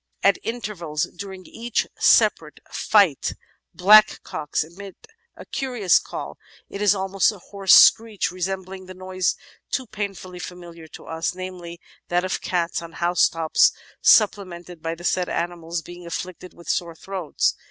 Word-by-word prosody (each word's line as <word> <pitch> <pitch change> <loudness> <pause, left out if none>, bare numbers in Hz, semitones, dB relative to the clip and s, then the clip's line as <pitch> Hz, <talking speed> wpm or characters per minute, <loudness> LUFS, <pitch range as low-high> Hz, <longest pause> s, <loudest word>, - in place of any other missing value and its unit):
"At 200 - +4
intervals 185 -10 -4
during 190 0 -8
each 235 0 -2
separate - - +3
fight, 200 -10 +2 0.4
blackcocks 190 -6 +4
emit 190 +5 -11 0.4
a - - -11
curious 245 -9 +1
call; - - -8 0.3
it 200 - -6
is 205 -1 +4
almost 195 +1 +1
a 210 - -11
hoarse 195 +1 +3
screech, 215 -7 +5
resembling 185 +1 -5
the 185 - -10
noise 185 0 -1 0.3
too 260 - -2
painfully 195 -4 -6
familiar 175 -2 -10
to - - -13
us, 160 +2 -3
namely, 180 -2 -8 0.3
that 175 +1 0
of 185 - -2
cats 170 -2 -1
on 165 -1 -10
housetops 165 -2 +3 0.3
supple 205 -2 +5
mented 175 -2 -11
by 165 +1 -3
the 175 - -13
said 180 0 0
animals 170 -1 -3
being 175 0 -11
afflicted 180 +1 -7
with 170 - -15
sore 170 -2 -1
throats. 185 -3 -1
185 Hz, 140 wpm, -23 LUFS, 170-195 Hz, 0.4 s, screech